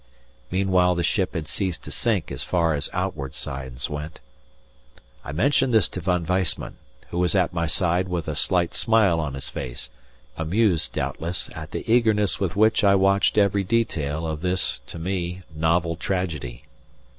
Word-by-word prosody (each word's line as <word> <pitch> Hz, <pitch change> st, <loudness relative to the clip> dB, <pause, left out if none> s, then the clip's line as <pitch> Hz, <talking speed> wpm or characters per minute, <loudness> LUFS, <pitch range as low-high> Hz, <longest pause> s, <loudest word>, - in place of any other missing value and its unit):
Meanwhile 90 Hz, -1 st, +2 dB
the 85 Hz, -, -1 dB
ship 95 Hz, 0 st, 0 dB
had 80 Hz, -3 st, -3 dB
ceased 95 Hz, -4 st, -2 dB
to -, -, -8 dB
sink 100 Hz, -9 st, 0 dB
as -, -, -4 dB
far 85 Hz, -3 st, +1 dB
as 75 Hz, -1 st, -2 dB
outward 80 Hz, -9 st, -3 dB
signs 65 Hz, 0 st, -4 dB
went. 75 Hz, +1 st, -6 dB, 1.0 s
I -, -, -6 dB
mentioned 130 Hz, -, +2 dB
this 105 Hz, -5 st, +5 dB
to -, -, -6 dB
Von 90 Hz, -2 st, 0 dB
Weissman, 90 Hz, -1 st, -1 dB, 0.3 s
who 85 Hz, -, -2 dB
was 90 Hz, +2 st, +1 dB
at 90 Hz, -2 st, +2 dB
my 85 Hz, -1 st, 0 dB
side 90 Hz, +3 st, +1 dB
with 85 Hz, -3 st, -3 dB
a 75 Hz, -, -1 dB
slight 85 Hz, +2 st, +1 dB
smile 105 Hz, -7 st, +3 dB
on 70 Hz, -4 st, -3 dB
his 70 Hz, -, -5 dB
face, 65 Hz, -1 st, -6 dB, 0.5 s
amused 90 Hz, +2 st, +1 dB
doubtless 85 Hz, +3 st, -3 dB
at 80 Hz, -2 st, -7 dB
the -, -, -6 dB
eagerness 110 Hz, -4 st, +3 dB
with 95 Hz, 0 st, -1 dB
which 110 Hz, +2 st, +4 dB
I 100 Hz, -1 st, +6 dB
watched 100 Hz, +2 st, +3 dB
every 100 Hz, -1 st, +3 dB
detail 85 Hz, -8 st, -1 dB
of 80 Hz, -1 st, -3 dB
this, 90 Hz, +1 st, +1 dB
to -, -, -8 dB
me, 90 Hz, +1 st, -3 dB
novel 85 Hz, +1 st, +1 dB
tragedy. 80 Hz, -9 st, -3 dB
90 Hz, 170 wpm, -24 LUFS, 80-95 Hz, 1.0 s, I